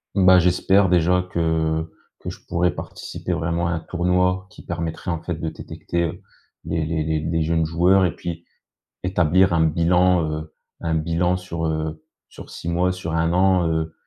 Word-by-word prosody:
Bah, 95 -2 +6
j'espère 95 +2 +3
déjà 90 +1 +3
que 80 -2 0 0.3
que - - -6
je - - -9
pourrais 90 +1 +1
participer - - -6
vraiment 85 +1 -1
à 85 - -1
un 80 - -1
tournoi 90 +2 0
qui - - -14
permettrait 85 0 -4
en 85 -1 -2
fait 85 - -3
de 80 0 -4
détecter, 85 +2 -4
heu, 85 - -4 0.4
les 80 -1 -1
les 80 -1 -1 0.2
les 80 +1 -1
jeunes 80 0 +1
joueurs 90 +4 +3
et 90 - 0
puis 85 0 -6 0.6
établir 90 0 +3
un 80 -1 +3
bilan, 85 +1 +2
heu, 80 0 -6 0.3
un 80 -1 0
bilan 85 +3 +1
sur, 85 -3 -4
heu, 80 0 -2 0.3
sur - - -12
6 85 - -7
mois 90 +2 +1
sur 90 -3 -5
1 80 +1 +1
an, 90 -1 +3
heu, 80 0 -1
85 Hz, 175 wpm, -22 LUFS, 80-90 Hz, 0.6 s, Bah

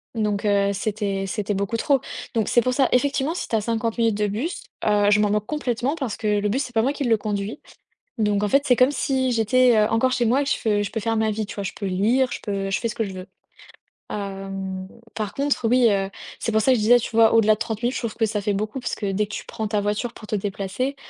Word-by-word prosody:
Donc, 210 -1 -1
heu, 200 -1 +3
c'était 200 -1 -2
c'était 205 +1 -2
beaucoup 200 +4 -1
trop, 275 +2 +2 0.3
donc 220 -3 0
c'est 240 - +4
pour 255 +2 0
ça, 265 0 +2
effectivement, 280 +4 +1
si - - -4
tu - - -1
as 220 - +2
50 230 +1 -2
minutes 225 -3 +2
de 210 0 +1
bus, 235 - -3 0.2
heu, 205 -1 +3
je 205 0 +4
m'en 210 - +2
moque 210 0 0
complètement 265 0 -1
parce 265 -9 -4
que, 210 -1 +1
le 205 0 0
bus 260 +7 0
c'est 245 - -9
pas 225 - +3
moi 260 +5 +1
qui 285 -1 -3
le 230 -2 +4
conduis, 205 +3 -4 0.6
donc 210 -1 +1
en - - +2
fait, 275 +6 +4
c'est 250 - +5
comme 255 +3 +4
si 265 -3 0
j'étais, 245 +2 +4
heu, 210 -1 +4
encore 225 +3 +2
chez 245 -2 +1
moi 250 +5 +3
et - - +1
que 275 - -2
je 210 -3 +1
je 205 - -5
peux 225 - -2
faire 225 +1 -1
ma 220 0 +1
vie, 215 0 -3
tu - - -8
vois? 200 - -4
Je 195 - -3
peux 200 - -4
lire, 225 +8 +2
je - - -5
peux 195 -1 -2
je 195 - 0
fais 230 - -2
ce - - -6
que 225 - -1
je 195 - -7
veux. 185 0 -8 0.8
Hem, 195 -1 -5 0.3
par 210 -2 -4
contre, 280 -4 0
oui, 245 0 +5
heu, 195 -2 0 0.3
c'est 225 - -2
pour 220 - +3
ça 260 - +3
que - - +5
je - - -1
disais, 245 +3 +6
tu - - -4
vois 225 0 +5
au-delà 220 -1 +5
de - - -20
30 225 -1 -3
minutes, 245 +2 0
trouve 230 -3 -4
que 225 - +1
ça 210 -1 -2
fait 205 0 -1
beaucoup, 215 +6 -3
parce 245 - -3
que 200 -2 -3
dès 205 +2 0
que - - -10
tu - - -6
prends 220 - -4
ta 210 -1 0
voiture 210 +4 -2
pour 215 - -11
te - - -1
déplacer, 205 +7 -3
220 Hz, 280 wpm, -23 LUFS, 205-245 Hz, 0.8 s, disais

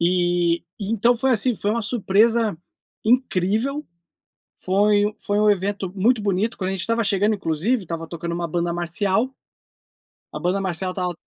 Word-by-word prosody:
E 175 -1 +1 0.2
então 225 +4 +2
foi, 265 +3 +1
assim, 245 +2 +3
foi 205 - -1
uma 230 +2 -1
surpresa 220 -1 +2 0.5
incrível, 240 +4 +1 0.7
foi 205 +2 +2
foi 205 0 -1
um 210 0 +4
evento 200 -1 -1
muito 220 +4 +2
bonito, 205 +2 -1
quando 185 -1 -2
a - - -1
gente 190 - -3
estava 230 +4 0
chegando 205 +1 +2
inclusive, 195 +6 -1
estava 165 -1 -5
tocando 170 0 -5
uma 170 0 -2
banda 170 +1 -1
marcial, 195 +8 -1 1.0
a - - -4
banda 185 +3 0
marcial 185 0 -2
estava 180 -1 -2
200 Hz, 155 wpm, -22 LUFS, 175-225 Hz, 1.0 s, um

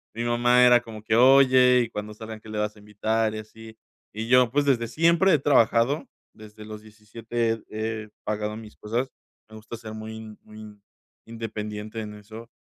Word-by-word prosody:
mi 115 - -3
mamá 120 +1 +3
era 120 -1 +6
como 110 -3 -11
que: 110 - 0
"Oye, 130 -1 +6
y - - -11
cuando 105 -1 -6
salgan, 110 0 -9
¿qué 110 - -14
le 110 - -5
vas 105 0 -2
a - - -17
invitar? 110 +1 -1
Y - - -5
así", 110 +1 -13 0.4
y 110 +2 -5
yo, 125 -1 +5
pues, 145 +2 +1
desde 120 -4 +1
siempre 170 +8 +3
he - - +5
trabajado, 130 0 +2 0.3
desde 105 0 -13
los 105 0 -9
17 115 +1 -4
he 110 0 -4
he 110 - -15 0.2
pagado 105 0 -3
mis 110 -1 -12
cosas. 120 +5 -3 0.4
Me 110 - -13
gusta 110 +2 -9
ser 110 -1 -9
muy 110 0 -9
muy 105 -1 -13 0.4
independiente 110 -1 -6
en 105 -1 -7
eso, 110 +3 -12
110 Hz, 185 wpm, -25 LUFS, 105-120 Hz, 0.4 s, era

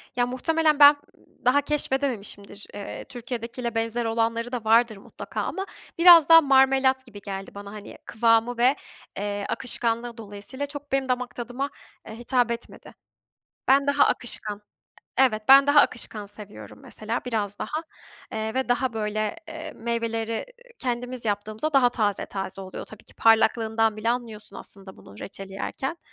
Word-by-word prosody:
Ya, 245 0 +2
muhtemelen 305 +4 +1
ben, 290 0 +9 0.2
ııı, - - -28
daha 265 +4 +4
keşfedememişimdir. 250 -8 -3
Eee, 205 - -7
Türkiye'dekiyle 240 -1 -5
benzer 230 +1 -1
olanları 230 +1 -1
da 245 -3 -4
vardır 225 -1 +3
mutlaka - - -7
ama 385 - -3 0.3
biraz 335 -3 +8
daha 330 0 +10
marmelat 265 -1 +3
gibi 205 -5 -12
geldi 195 -1 -6
bana, 200 0 -8
hani, 210 -1 -10
kıvamı 230 +1 +2
ve, 250 +4 +4 0.4
eee, 205 0 -3
akışkanlığı 235 -1 -2
dolayısıyla 215 +6 -7
çok 290 0 -10
benim 270 -1 0
damak 250 0 -2
tadıma, 245 +4 -4 0.4
eee, 220 - -8
hitap 240 0 0
etmedi. 235 - -8 0.8
Ben 275 +1 +5
daha 285 0 +4
akışkan 210 -4 -2 0.6
Evet, 225 -5 +3
ben 275 +1 +8
daha 290 +1 +6
akışkan 220 -5 -2
seviyorum 205 0 -12
mesela, 225 +3 -5
biraz 210 -4 -2
daha. 310 - -3 0.5
Eee, 220 0 -3
ve 260 -1 -1
daha, 245 0 +1
böyle, 215 +1 -2
eee, 320 0 -7
meyveleri 230 -1 -2 0.3
kendimiz 245 -1 -4
yaptığımızda 215 +8 -2
daha 260 -3 +5
taze 210 -5 -1
taze 195 -1 -6
oluyor 190 -1 -8
tabii 220 - -14
ki. - - -20
Parlaklığından 225 -1 +3
bile 220 +2 -1
anlıyorsun 230 -3 -4
aslında 195 -1 -11
bunun 100 - -15
reçeli 195 0 -8
yerken. 270 - -4
235 Hz, 150 wpm, -25 LUFS, 215-265 Hz, 0.8 s, daha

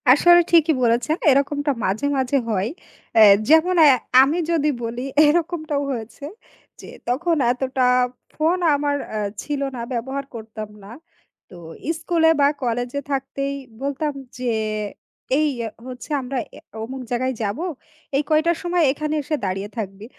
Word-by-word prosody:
আসলে 345 +7 +7
ঠিকই 325 -2 +5
বলেছেন। 235 +5 +2
এরকমটা 285 +1 +2
মাঝে, 200 +9 -1
মাঝে 265 +1 +1
হয়। 205 0 0 0.5
অ্যা 225 - +6 0.3
যেমন 320 +4 +5
অ্যা 285 -4 +7 0.3
আমি 285 +5 +2
যদি 300 -3 +2
বলি 230 +1 -4 0.2
এরকমটাও 310 -2 0
হয়েছে 230 +2 -6 0.6
যে - - -11 0.2
তখন 330 +8 +1 0.2
এতটা 260 +1 -1 0.5
ফোন 325 +4 +1 0.2
আমার 285 0 0
অ্যা 215 - -3 0.2
ছিল 290 -2 -3
না, 240 - -5
ব্যবহার 265 +4 -3
করতাম 220 -1 -7
না। 200 - -11 0.6
তো - - -13 0.4
স্কুলে 330 -2 +2
বা 280 - +6 0.2
কলেজে 245 +3 -2
থাকতেই 275 +1 -2 0.3
বলতাম 285 +2 -2 0.2
যে 255 - -5 0.9
"এই 310 - +3 0.4
হচ্ছে 255 +3 -9
আমরা 260 +1 -4
অ্যা - - -14 0.2
অমুক 260 +3 -6
জায়গায় 255 +2 0
যাবো, 215 - -2 0.5
এই 280 - +2
কয়টার 315 +2 +2
সময় 350 -1 +1
এখানে 305 +2 -3
এসে 305 - -1
দাঁড়িয়ে 195 +2 -3
থাকবি।" 200 -1 -5
275 Hz, 140 wpm, -22 LUFS, 240-310 Hz, 0.9 s, আসলে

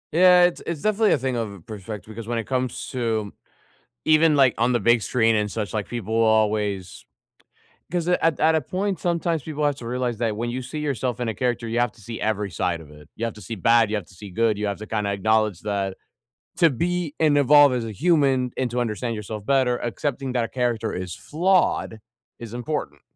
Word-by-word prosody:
Yeah, 180 +2 +6
it's 175 -1 +2
it's 165 -4 -4
definitely 215 0 +3
a - - +3
thing 130 -1 -2
of 100 -7 -5
perspective 105 -1 -8
because 115 0 -8
when 120 0 -1
it 115 - -3
comes 130 -2 -2
to 110 -5 -2 0.7
even, 155 0 +5
like, 135 -4 +5
on 120 +2 +2
the 120 - +2
big 120 +2 +3
screen 115 +1 +2
and 105 -1 0
such, 105 -3 -4
like, 105 -4 -2
people 110 -2 -4
always 105 -4 +1 0.9
'cause 175 -1 -1
at 165 -3 +2
at 160 +1 +4
a 160 - +3
point, 195 0 -2
sometimes 170 -2 -1
people 150 0 -3
have 145 -1 0
to 120 - -9
realize 125 0 -2
that 115 -2 0
when 120 +2 -2
you 130 +2 -4
see 130 +5 -6
yourself 130 -4 -2
in 120 - -1
a 110 - -2
character, 120 -1 -1
you 115 +1 -1
have 120 -2 +1
to - - -20
see 110 +2 -7
every 105 -2 -1
side 85 0 -1
of 75 -2 -13
it. 75 0 -15
You 115 - -3
have 115 - -5
to 105 - -12
see 115 - -5
bad; 115 +2 +3
you 110 - 0
have 100 -5 -5
to - - -18
see 100 +2 -10
good; 110 +3 +1
you 105 - -1
have 100 -1 -2
to 110 - -8
kinda 105 -2 -1
acknowledge 110 -2 +1
that 100 -2 -2 0.6
to 170 -2 +6
be 170 +3 -2
and 150 -2 +4
evolve 145 0 +6
as 120 -2 -1
a 110 - -5
human 135 - +2
and 130 -2 0
to 125 +1 -1
understand 115 0 -2
yourself 105 -1 -6
better, 130 -3 +2
accepting 130 +3 -3
that 120 -2 -1
character 120 -3 -1
is 90 -2 -5
flawed 170 - +1 0.4
is 115 -2 -9
important. 120 - -4
120 Hz, 220 wpm, -23 LUFS, 105-140 Hz, 0.9 s, Yeah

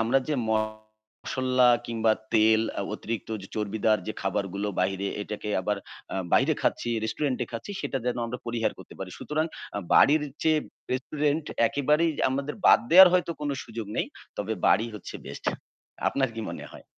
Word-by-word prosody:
আমরা 115 +4 +3
যে 155 - +1
মশলা 110 +4 0 0.2
কিংবা 115 -1 +2 0.2
তেল 110 0 +5 0.2
আ - - 0
অতিরিক্ত 110 -1 -5 0.3
চর্বিদার 110 0 +1
যে 110 - -2
খাবারগুলো 100 +1 -1
বাইরে 95 +1 0 0.2
এটাকে 105 0 -6
আবার 105 +2 -1 0.4
আ - - -3 0.2
বাইরে - - +4
খাচ্ছি, 120 - 0
রেস্টুরেন্টে 130 +2 -1
খাচ্ছি 115 - -6
সেটা 135 - -2
যেন 125 - 0
আমরা 125 +2 -5
পরিহার 115 -1 0
করতে - - -12
পারি। 95 -1 -6
সুতরাং 155 +1 -1 0.3
আ - - 0 0.2
বাড়ির 150 +1 +6 0.2
চেয়ে 155 -1 +4 0.3
রেস্টুরেন্ট 145 +4 0 0.2
একেবারেই 150 +4 +2 0.2
আমাদের 140 +2 -2
বাদ - - +8
দেয়ার 185 +2 +11
হয়তো 180 -1 +2
কোন 145 -1 -1
সুযোগ 115 -2 -6
নেই। - - +1 0.3
তবে - - -2
বাড়ি 110 +4 +4
হচ্ছে 105 - -8
বেস্ট। - - -9 0.6
আপনার 135 -1 +1
কি 115 - -4
মনে - - -7
হয়? - - -12
115 Hz, 160 wpm, -27 LUFS, 110-140 Hz, 0.6 s, দেয়ার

